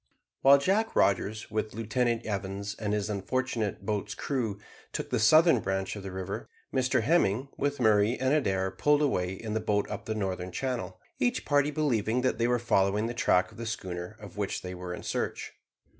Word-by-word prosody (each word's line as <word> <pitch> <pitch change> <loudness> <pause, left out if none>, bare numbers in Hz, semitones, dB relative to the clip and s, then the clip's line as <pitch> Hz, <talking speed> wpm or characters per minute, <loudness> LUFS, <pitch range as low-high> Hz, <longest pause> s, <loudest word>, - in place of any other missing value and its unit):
While 140 +1 +8
Jack 200 +10 +1
Rogers, 105 +3 +1
with 110 0 -2
Lieutenant 115 +1 0
Evans 100 -1 -3
and 105 -2 -3
his 105 -1 0
unfortunate 105 0 -2
boat's 105 -1 -2
crew, 120 -8 -2 0.4
took - - -4
the 125 - +1
southern 155 +5 +6
branch 95 0 -2
of 105 - -6
the 95 -1 -6
river, 95 +1 -5 0.2
Mr 130 0 +2
Hemming, 135 - +2
with 145 0 -1
Murray 110 0 +3
and 130 +2 +2
Adair, 95 -10 +1
pulled 145 +9 +2
away 90 -10 0
in 105 +2 -5
the 110 - +1
boat 105 -1 0
up 105 +1 -5
the 110 - -2
northern 95 -3 -3
channel, 120 -3 -3 0.2
each 245 0 0
party 145 0 +3
believing 125 -6 +1
that 125 -3 0
they 115 - +3
were 125 0 +3
following 105 -2 +2
the 120 - -2
track 90 -6 +2
of - - -14
the 115 - -4
schooner 95 -2 -5
of 105 -3 -11
which 100 -1 -2
they 90 0 -5
were 90 0 -6
in 90 - -6
search. - - -3
110 Hz, 190 wpm, -29 LUFS, 95-130 Hz, 0.4 s, While